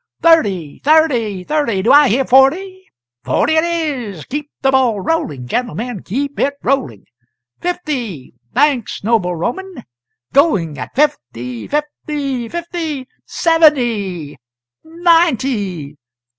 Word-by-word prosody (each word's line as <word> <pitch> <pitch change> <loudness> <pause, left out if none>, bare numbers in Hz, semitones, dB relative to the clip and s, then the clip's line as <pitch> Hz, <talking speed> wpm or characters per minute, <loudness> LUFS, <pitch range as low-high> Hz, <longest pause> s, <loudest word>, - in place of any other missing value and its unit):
Thirty, 200 - +3
thirty, 255 - +2
thirty! 230 -6 0
do - - +3
I 290 0 +7
hear 260 +5 +1
forty? 360 +10 +3 0.4
forty 315 - +1
it 315 0 +3
is! 285 - -3
Keep 295 +2 -5
the 270 - +4
ball 255 -6 +2
rolling, 170 - -2
gentlemen, 240 - -3
keep 280 +7 -4
it 280 +1 +1
rolling! 140 - -1 0.5
fifty! 260 - -4 0.2
thanks, 270 -7 +1
noble 200 -5 +1
Roman! 250 - -4 0.5
going 190 - +2
at - - -7
fifty, 125 - -1
fifty, 290 -4 -3
fifty! 330 -4 -4 0.2
seventy! 235 - +1 0.4
ninety! 265 - +1
265 Hz, 105 wpm, -17 LUFS, 195-310 Hz, 0.5 s, I